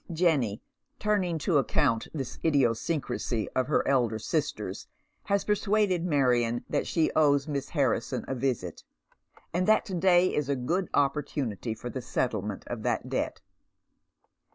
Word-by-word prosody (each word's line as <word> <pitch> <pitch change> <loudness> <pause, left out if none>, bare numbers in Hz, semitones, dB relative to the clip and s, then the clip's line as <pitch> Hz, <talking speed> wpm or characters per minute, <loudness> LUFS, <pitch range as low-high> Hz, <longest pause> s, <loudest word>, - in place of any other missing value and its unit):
Jenny, 155 - +1 0.3
turning 200 -5 0
to 160 -6 +4
account 130 -4 +1
this 135 -5 -5
idiosyncrasy 130 -4 0
of 130 -1 -1
her 150 - +1
elder 120 -5 +2
sister's, 110 - -3 0.4
has 200 0 +1
persuaded 205 -3 +1
Marion 125 -7 +2
that - - -1
she 160 -2 +1
owes 145 -2 +3
Miss 140 -2 -3
Harrison 130 -4 0
a - - -2
visit, 120 -9 -2 0.7
and 180 +2 0
that 215 +2 +4
to 200 - -6
day 180 0 +4
is 145 -2 -1
a 140 - +2
good 170 +9 -1
opportunity 135 - -1
for 120 - -7
the 130 - -4
settlement 105 -5 -2
of 120 -2 -5
that - - -1
debt. - - -2
140 Hz, 140 wpm, -28 LUFS, 120-170 Hz, 0.7 s, to